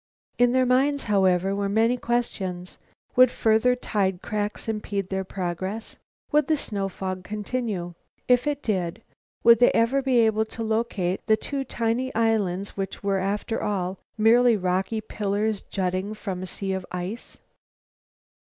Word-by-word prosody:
In 245 0 +5
their 255 0 +3
minds, 270 +3 +2
however, 190 -2 +2
were 200 0 -1
many 225 +4 +3
questions. 195 -7 -3 0.4
Would 255 0 +7
further 225 +2 +3
tide 195 -6 -1
cracks 210 +1 -3
impede 205 -3 -3
their 190 0 -1
progress? 190 +3 -4 0.4
Would 300 -2 +3
the 315 - +2
snow 200 -7 -3
fog 185 -1 -5
continue? 210 -3 -3 0.3
If 250 +3 +3
it 290 -1 -1
did, 180 -6 -2 0.4
would 235 -1 +7
they 245 - +6
ever 235 +4 +3
be 260 -2 +2
able 220 -1 +2
to 225 +1 -6
locate 220 -5 -1
the 220 - +4
two 275 +3 -3
tiny 240 +1 -1
islands 205 -4 0
which 195 0 -5
were, 195 -1 +1
after 205 +4 -2
all, 190 -2 -2 0.2
mere 225 +3 +5 0.2
rocky 190 +4 -1
pillars 210 0 -1
jutting 190 +2 -2
from 190 -4 -5
a 185 - -5
sea 195 +1 -3
of 190 -1 -3
ice? 180 +6 -5
210 Hz, 150 wpm, -25 LUFS, 190-235 Hz, 0.4 s, Would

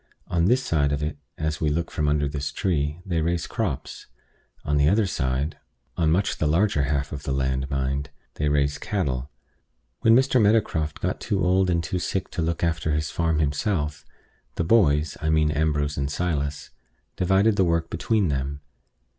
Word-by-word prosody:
On 85 -1 +1
this 125 +7 +3
side 75 - +1
of 70 +1 -1
it, 75 -1 -3 0.2
as 80 -1 -2
we 75 - +2
look 85 +3 -2
from 75 - -1
under 75 0 +2
this 70 0 -3
tree, 75 -3 -1
they 85 -4 0
raise 85 +1 0
crops: - - -4 0.6
on 75 0 +1
the 70 +1 +4
other 105 +3 +3
side 70 -3 -2 0.4
on 80 -2 +2
much 95 +5 +1
the 75 - +1
larger 80 -2 +2
half 70 0 -1
of 75 - -5
the 70 - -4
land, 65 0 -1
mind 70 +1 -2 0.2
they 75 - -1
raise 70 0 +1
cattle. 70 - -2 0.7
When 115 -1 +5
Mr. 130 -1 +4
Meadowcroft 100 -8 +1
got - - -2
too 95 -2 0
old 95 +1 +3
and 85 -1 +1
too 90 +3 -2
sick 95 +1 -3
to - - -2
look 85 +1 -1
after 85 -2 0
his 75 0 -1
farm 80 -2 0
himself, 75 0 -1 0.5
the - - 0
boys 80 -6 +3
(I 80 - 0
mean 80 -1 +3
Ambrose 75 -1 0
and 70 0 -1
Silas) 75 -3 -2 0.4
divided 95 +4 +3
the 95 - +3
work 85 -1 0
between 100 +2 +1
them. 70 +1 -2
80 Hz, 180 wpm, -25 LUFS, 70-90 Hz, 0.7 s, When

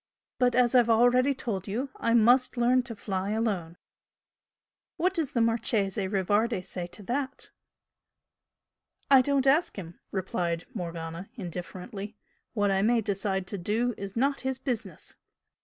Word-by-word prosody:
But, 245 -2 +3
as 245 -1 +4
I've 245 -2 +5
already 245 +4 +4
told 200 -7 -4
you, 250 +7 -3
I 230 0 +1
must 245 +3 +4
learn 245 +2 +4
to 230 - -5
fly 195 -2 -3
alone." 200 -7 -2 1.2
"What 365 +3 +1
does 325 -7 -2
the 235 - +2
Marchese 220 -3 +1
Rivardi 205 +2 +1
say 180 -1 -5
to 205 - -8
that?" 260 +5 -3 1.6
"I 270 -2 +9
don't 275 0 +1
ask 295 +6 +3
him!" 170 -3 -8
replied 175 -3 -2
Morgana, 170 -2 -6
indifferently 195 +2 -7 0.4
"What 205 -2 +2
I 195 0 +2
may 230 +3 +3
decide 195 -2 -2
to 200 - -4
do 225 +7 0
is 200 0 -7
not 275 +4 +1
his 265 -1 -2
business." 255 -4 -5
220 Hz, 140 wpm, -28 LUFS, 190-250 Hz, 1.6 s, I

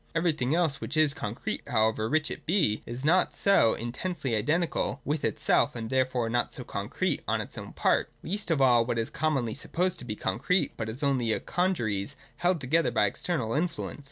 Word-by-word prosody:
Everything 155 -5 +1
else 165 -5 +1
which 155 - -3
is 155 -2 +5
concrete, 120 -4 -4
however 110 0 +1
rich 155 +1 +1
it - - -8
be, 160 - +2
is 125 +4 -5
not 175 +4 +3
so 195 - +4
intensely 130 +2 -3
identical 150 +5 0
with 150 +1 -1
itself - - +2
and 115 -1 -5
therefore 130 -2 +1
not 120 +1 0
so - - -5
concrete - - -2
on - - +1
its - - -6
own - - -7
part, - - +1
— - - -37
least 205 +3 -3
of 165 -4 +2
all 125 -3 +5
what 120 0 -2
is 115 0 -2
commonly 140 -7 0
supposed 180 +5 -1
to - - -7
be 105 -3 -3
concrete, 160 - 0
but 110 -1 -4
is 125 +7 -6
only 130 -5 +2
a - - +1
congeries 115 - -1 0.2
held 175 -1 +1
together 155 +5 +2
by 105 - +2
external 115 - -2
influence. 165 0 -2
135 Hz, 195 wpm, -28 LUFS, 115-165 Hz, 0.2 s, is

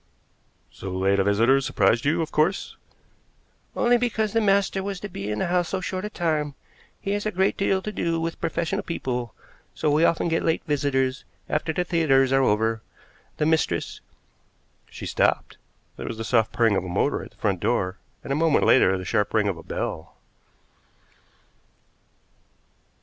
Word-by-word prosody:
"So 95 - -8
late 95 +2 +1
a - - +4
visitor 115 +7 +3
surprised 115 -1 +1
you, 165 +3 +2
of 155 - -7
course?" 160 +6 0 1.0
"Only 240 0 +3
because 220 -3 -1
the 225 - +2
master 200 -1 +2
was 195 -1 -4
to 205 - -5
be 100 - -6
in 105 - -2
the - - 0
house 175 -1 0
so 190 - -1
short 185 +1 -4
a - - -3
time. 155 -7 -1 0.4
He 200 - -3
has 205 +1 -1
a - - -1
great 190 +1 +1
deal 190 -1 0
to 210 - -4
do 165 -5 -1
with 165 0 -4
professional 170 +5 -1
people, 125 -8 -4 0.4
so 150 - 0
we 150 +3 +3
often 170 0 +2
get 165 0 +1
late 165 0 0
visitors 135 -3 0 0.2
after 155 +2 -1
the 180 +3 -1
theaters 145 -7 +2
are 135 0 +4
over. 110 -1 +1 0.6
The 150 - +1
mistress 155 - 0 0.4
" - - -39
She - - -8
stopped. - - 0 0.4
There - - -6
was 115 - -5
the 115 - -4
soft 115 0 +2
purring 115 -3 +2
of 95 - 0
a 90 - -6
motor 85 - 0
at - - -10
the - - -29
front - - 0
door, 90 +2 -1 0.2
and 135 - -2
a - - 0
moment 160 -1 +3
later 95 -7 +5
the 95 - -6
sharp 105 +4 0
ring 105 -2 +3
of 95 -4 -1
a - - -9
bell. 80 0 -5
150 Hz, 180 wpm, -24 LUFS, 110-180 Hz, 1.0 s, later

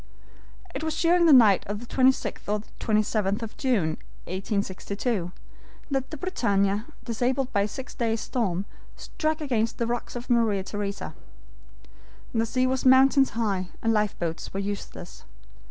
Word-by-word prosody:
"It - - -4
was 315 -1 -2
during 340 0 +4
the - - +7
night 220 -8 +7
of 205 +1 -3
the 240 - -9
26th 260 +2 +1
or 210 0 -1 0.2
27th 215 -1 +1
of 220 - -7
June, 235 - +1 0.4
1862, 200 +1 -2 0.6
that 270 -1 -1
the 310 - -6
BRITANNIA, 205 - 0 0.2
disabled 250 +3 -1
by 200 - +3
a 200 - +1
six 260 +5 -7
days' 225 -3 -1
storm, 200 -7 -1 0.3
struck 310 0 -2
against 230 -6 0
the 235 - 0
rocks 240 +1 -3
of 245 0 -6
Maria 225 -5 +2
Theresa. 200 0 -4 1.2
The 225 -1 +1
sea 255 +2 +1
was 260 0 0
mountains 265 +1 +6
high, 195 -5 0
and 225 0 +3
lifeboats 195 -6 -1
were - - 0
useless. 200 -3 -6
225 Hz, 145 wpm, -26 LUFS, 200-260 Hz, 1.2 s, the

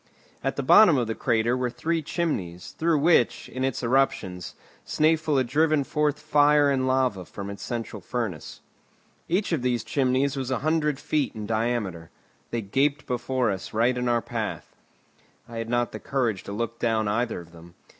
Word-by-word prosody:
At - - -1
the - - -2
bottom 195 -9 +7
of 120 - +1
the 110 - -2
crater 115 +2 +1
were 125 -1 -1
three 160 +7 -1
chimneys, 120 - -3
through 165 -1 +3
which, 145 -5 +3
in 130 - -4
its 135 -2 -1
eruptions, 115 -8 0 0.3
Snæfell 155 -1 +2
had 130 - +2
driven 155 +3 +2
forth 150 +1 0
fire 150 -1 +4
and 130 -1 0
lava 130 -7 +1
from 100 +2 -7
its 100 - -9
central 115 -3 -5
furnace. 110 - -5 0.7
Each 190 +4 0
of 160 -6 0
these 125 -1 0
chimneys 135 +1 +1
was 130 -2 -3
a 130 - 0
hundred 155 -3 +1
feet 150 -5 -1
in 105 -1 -5
diameter. 110 -7 -2 0.4
They 115 - -2
gaped 140 +8 0
before 125 -2 0
us 95 -1 -6
right 120 +3 +3
in 125 0 -1
our 120 -1 +1
path. - - -5 0.7
I 115 - -8
had 115 0 -4
not 120 0 0
the - - -7
courage 120 -8 -1
to - - -6
look 115 +2 -4
down 110 -2 +1
either 115 +1 -1
of 85 -1 -13
them. 85 0 -15
125 Hz, 180 wpm, -25 LUFS, 110-145 Hz, 0.7 s, bottom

